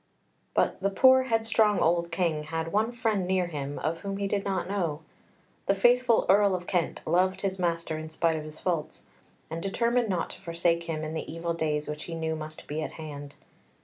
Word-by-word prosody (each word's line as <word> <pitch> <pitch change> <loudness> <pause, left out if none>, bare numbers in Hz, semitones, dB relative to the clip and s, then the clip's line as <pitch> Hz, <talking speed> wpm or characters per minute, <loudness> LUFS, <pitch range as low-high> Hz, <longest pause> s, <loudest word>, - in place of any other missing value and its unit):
But - - +1
the 195 - +2
poor, 260 +6 +6
headstrong 225 -3 +3
old 170 +1 +2
King 160 -5 0
had 165 +1 -3
one 215 +3 +1
friend 220 -6 0
near 185 -1 +2
him 145 -4 -5
of 165 +2 -2
whom 195 -1 -4
he 200 - -1
did 200 0 -1
not 190 -2 -1
know. 170 -6 -1 0.7
The 195 - +4
faithful 240 +3 +4
Earl 200 0 +5
of 180 -1 -5
Kent 175 -2 -1
loved 185 +2 +2
his 190 -1 -2
master 170 -2 -1
in 155 0 -7
spite 160 +1 +1
of 155 - -4
his 155 0 -9
faults, 170 -5 -2 0.5
and 165 +1 -3
determined 235 +4 +1
not 180 -3 -1
to - - -10
forsake 170 -1 0
him 160 -2 -3
in 155 0 -4
the 160 - -4
evil 165 +1 -2
days 150 -2 -1
which 150 0 -5
he 165 - -5
knew 160 -1 -2
must 155 0 -8
be 150 +2 -3
at - - -4
hand. 145 -2 -8
170 Hz, 205 wpm, -28 LUFS, 160-195 Hz, 0.7 s, poor